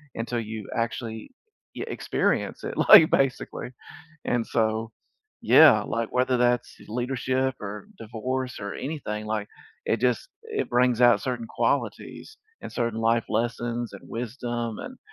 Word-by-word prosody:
until 120 +1 -2
you 110 -2 -6
actually, 115 -1 -3 0.4
yeah, - - -5
experience - - -1
it, - - -4
like, 160 - +8
basically 135 -2 0 0.6
and 120 -1 0
so 110 0 0 0.5
Yeah, 135 -10 +7
like, 115 +1 -2
whether 125 0 +2
that's 120 0 +1
leadership 130 +2 -1
or 105 0 -7
divorce 125 +3 -4
or 100 0 -5
anything, 110 -8 -5
like, 110 -1 -2 0.4
it 110 - +1
just 125 - +1
it 450 -1 -3
brings 125 -1 +2
out 120 -1 +5
certain 125 -4 -3
qualities 435 - -2 0.2
and - - -8
certain 115 -2 -1
life 115 0 +2
lessons 120 +1 -2
and - - -10
wisdom 120 -1 -4
and 255 0 -9
120 Hz, 135 wpm, -26 LUFS, 110-125 Hz, 0.6 s, like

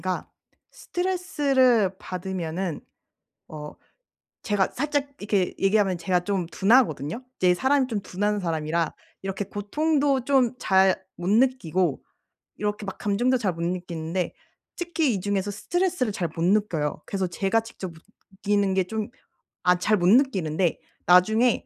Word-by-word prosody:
그러니까 185 -1 -3 0.4
스트레스를 280 - +1
받으면은 180 -2 -4 0.7
어 150 -1 -8 0.7
제가 205 -3 +1
살짝 290 +1 -1
이렇게 200 -3 0
얘기하면 195 -2 +2
제가 180 +1 +1
좀 190 -3 -1
둔하거든요. 195 - +2
이제 180 -1 +3
사람이 265 +6 +2
좀 220 -4 -2
둔한 205 +2 -1
사람이라 165 -1 -1 0.3
이렇게 195 +1 -3
고통도 275 +7 0
좀 260 -3 +3
잘 190 -4 +3 0.2
못 175 - -2
느끼고 190 - +2 0.5
이렇게 210 0 -3
막 195 - -5
감정도 240 +6 +1
잘 205 -6 0
못 165 - -9
느끼는데 175 0 -3 0.4
특히 330 -6 0
이 195 - -2
중에서 200 +1 -1
스트레스를 330 - -1
잘 175 -3 -2
못 165 - -3
느껴요. 175 -7 +1
그래서 190 -2 -2
제가 195 +5 +1
직접 220 -5 -8 0.4
느끼는 200 0 0
게 190 -1 +2
좀 215 +3 -4 0.6
아 180 0 +5
잘 215 +4 +2
못 175 -2 +1
느끼는데 190 - +2 0.3
나중에 220 +7 +4
200 Hz, 300 characters per minute, -25 LUFS, 180-240 Hz, 0.7 s, 아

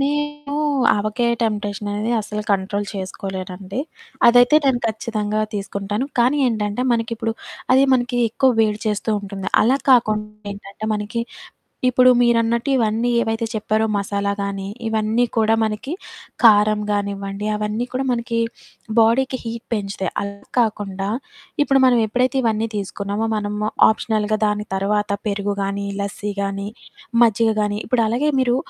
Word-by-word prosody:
మేము 295 0 -2 0.4
ఆవకాయ 215 +3 0
టెంప్టేషన్ 205 -2 -2
అనేది, 210 +3 -2
అస్సలు 210 0 -4
కంట్రోల్ 200 +1 0
చేసుకోలేనండి. 190 +2 -5 0.5
అదైతే 245 +4 +6
నేను 255 -3 +2
ఖచ్చితంగా 215 -1 -2
తీసుకుంటాను. 200 +3 -3
కానీ 250 +5 +4
ఏంటంటే, 210 +1 -1
మనకిప్పుడు 230 -1 -1 0.4
అది 265 - +6
మనకి 245 0 +1
ఎక్కువ 260 +4 +2
వేడి 215 -1 +2
చేస్తూ 210 +1 -1
ఉంటుంది. 195 -1 -5
అలా 255 +5 +4
కాకుండా, 215 -4 +3 0.2
ఏంటంటే 200 +1 -9
మనకి, 210 +3 -3 0.7
ఇప్పుడు 255 0 +5
మీరన్నట్టు, 235 +2 +2
ఇవన్నీ 230 +1 +1
ఏవైతే 225 +1 -1
చెప్పారో, 215 +1 0
మసాలా 200 0 -1
కానీ, 195 -1 -4 0.2
ఇవన్నీ 220 +2 +1
కూడా 220 0 +3
మనకి 220 +7 -3 0.5
కారం 210 -1 +6
కానివ్వండి, 200 0 -3
అవన్నీ 210 +3 -2
కూడా 265 +1 -1
మనకి 235 -1 -2 0.6
బాడీకి 255 +3 +3
హీట్ 230 0 -6
పెంచుతాయి. 195 -3 -3
అలా 200 0 -9
కాకుండా, 200 -3 -1 0.6
ఇప్పుడు 270 -2 +3
మనం 245 -2 +4
ఎప్పుడైతే 255 +4 +1
ఇవన్నీ 225 0 +1
తీసుకున్నామో, 200 +2 -3
మనము 210 0 -2 0.2
ఆప్షనల్‌గా 215 -1 0
దాని 210 0 -2
తరవాత, 205 +1 0 0.2
పెరుగు 200 0 -1
గానీ, 200 +1 -2 0.2
లస్సీ 200 +1 -4
గానీ, 200 0 -3 0.5
మజ్జిగ 225 0 +4
గాని 205 0 -1
ఇప్పుడు 235 -1 +2
అలాగే 275 +7 +1
మీరు 245 -1 +2
215 Hz, 130 wpm, -21 LUFS, 205-235 Hz, 0.7 s, అదైతే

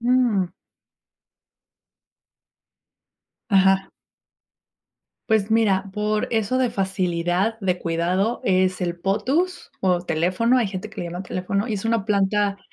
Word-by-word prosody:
Ujú. 235 -7 +2 3.0
Ajá. 195 -1 +4 1.4
Pues 215 -1 +3
mira, 200 -4 +2
por 210 0 0
eso 225 +3 +1
de 250 -2 +1
facilidad 190 +1 0
de 180 -2 0
cuidado 180 +7 0
es 185 0 +1
el 175 -1 -2
Potus 255 - -1
o 180 -2 +1
Teléfono. 180 +9 +1
Hay 230 - +1
gente 195 +2 -6
que - - -7
le 175 - -3
llama 175 +2 -5
Teléfono 200 +4 -2
y 215 - -1
es 195 - -5
una 225 -3 +1
planta 200 -1 +1
195 Hz, 120 wpm, -23 LUFS, 185-220 Hz, 3.0 s, Ajá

